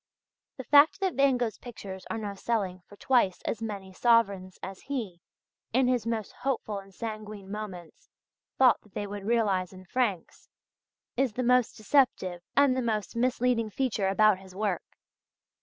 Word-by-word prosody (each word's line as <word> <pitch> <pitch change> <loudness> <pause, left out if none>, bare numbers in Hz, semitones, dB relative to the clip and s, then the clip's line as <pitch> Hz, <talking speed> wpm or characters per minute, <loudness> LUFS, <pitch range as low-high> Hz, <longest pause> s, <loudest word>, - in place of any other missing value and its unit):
The 260 - -6
fact 290 +6 +6
that 380 -3 0
Van 275 -1 +3
Gogh's 235 -3 -2
pictures 195 -6 -9
are - - -2
now 210 -2 -4
selling 195 -3 -2
for 205 - -14
twice 220 -5 +2
as 225 - -3
many 200 -4 -5
sovereigns 200 -5 +2
as 190 0 -6
he, 225 -11 -5 0.5
in 255 +1 +3
his 245 -3 +1
most 225 -3 -2
hopeful 245 -5 -3
and 195 0 -14
sanguine 215 -2 -7
moments 190 -6 -8 0.5
thought 255 -2 +5
that 210 - -24
they 205 - -2
would 205 0 -6
realize 200 -6 +1
in 185 0 -12
francs, 205 -4 -2 0.7
is 260 -3 +1
the 255 - -2
most 250 -1 +3
deceptive 210 -7 +2 0.2
and 280 -2 +5
the 260 - 0
most 220 -3 -2
misleading 245 -2 +1
feature 220 -4 -1
about 205 0 +4
his 190 -1 -14
work. 200 -3 -3
215 Hz, 160 wpm, -28 LUFS, 195-250 Hz, 0.7 s, fact